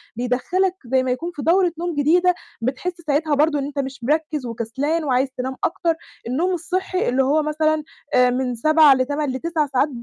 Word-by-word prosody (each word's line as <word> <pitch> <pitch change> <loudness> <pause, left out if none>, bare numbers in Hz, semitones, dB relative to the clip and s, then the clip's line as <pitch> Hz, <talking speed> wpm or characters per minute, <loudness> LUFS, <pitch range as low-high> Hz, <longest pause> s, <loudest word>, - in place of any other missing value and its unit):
بيدخّلك 260 +11 0
زي 260 +1 +1
ما 255 - -1
يكون 335 +8 -3
في 290 - -5
دورة 350 +3 +3
نوم 345 -2 -3
جديدة، 350 +5 +3 0.3
بتحس 265 +9 -2
ساعتها 295 +1 +1
برضه 295 0 +2
إن 275 - -2
أنت 285 0 -5
مش 265 -2 -5
مركِّز 300 0 -1
وكسلان 265 +8 -2
وعايز 265 -1 +1
تنام 260 +1 -3
أكتر، 335 -1 0 0.3
النوم 335 +10 0
الصحّي 365 +1 -1
اللي 265 +2 +2
هو 300 +3 +2
مثلًا 310 0 0 0.3
آآ 250 0 +5
من 250 0 -1
7 310 +3 +6
ل8 285 +2 -1
ل9 310 +2 -1
ساعات 275 +2 +1
290 Hz, 180 wpm, -21 LUFS, 260-330 Hz, 0.3 s, 7